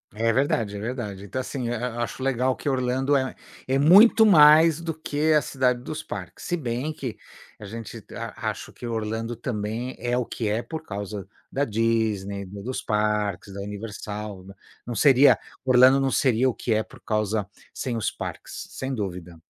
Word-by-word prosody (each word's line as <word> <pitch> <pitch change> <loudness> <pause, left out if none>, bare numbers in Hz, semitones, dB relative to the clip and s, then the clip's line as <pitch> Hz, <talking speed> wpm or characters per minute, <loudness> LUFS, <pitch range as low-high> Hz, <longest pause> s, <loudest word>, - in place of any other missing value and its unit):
É 115 +2 +2
verdade, 115 -5 0
é - - -5
verdade, 105 -4 -5
então 130 +6 -3
assim, 130 -1 -4
a 120 0 -3
a - - +1
acho 130 - -5
legal 130 -1 +1
que 145 - -3
Orlando 130 +1 +1
é 130 -1 -2 0.3
é 130 +1 +2
muito 200 +10 +7
mais 160 -3 +7
do 165 -1 -3
que 155 0 0
a 150 - +5
cidade 125 -3 0
dos 155 +4 -5
parques, - - -8
se 175 - 0
bem 130 0 -3
que 130 -6 -6 0.4
a - - -9
gente 115 +2 -8
a - - -4
acho - - -7
que 120 - -8
Orlando 115 +1 -3
também 115 +1 -4
é 120 0 0
o 125 - 0
que 110 - -4
é 110 +3 0
por 160 -1 -6
causa 100 - -6 0.2
da 140 +1 0
Disney, 110 -3 0
dos 100 +7 -5
parques, 105 -2 -1
da 100 - -7
Universal, 105 -1 -6
né, 100 - -11 0.3
não 120 - -4
seria 140 +2 +6 0.3
Orlando 130 +1 +6
não 135 -1 +1
seria 130 -1 +3
o - - -1
que 115 - -1
é 110 0 +1
por - - -17
causa 105 -1 -1 0.3
sem 125 -3 -3
os 110 - 0
parques, - - -7
sem 135 0 -4
dúvida. 90 -5 -5
120 Hz, 185 wpm, -25 LUFS, 105-135 Hz, 0.4 s, muito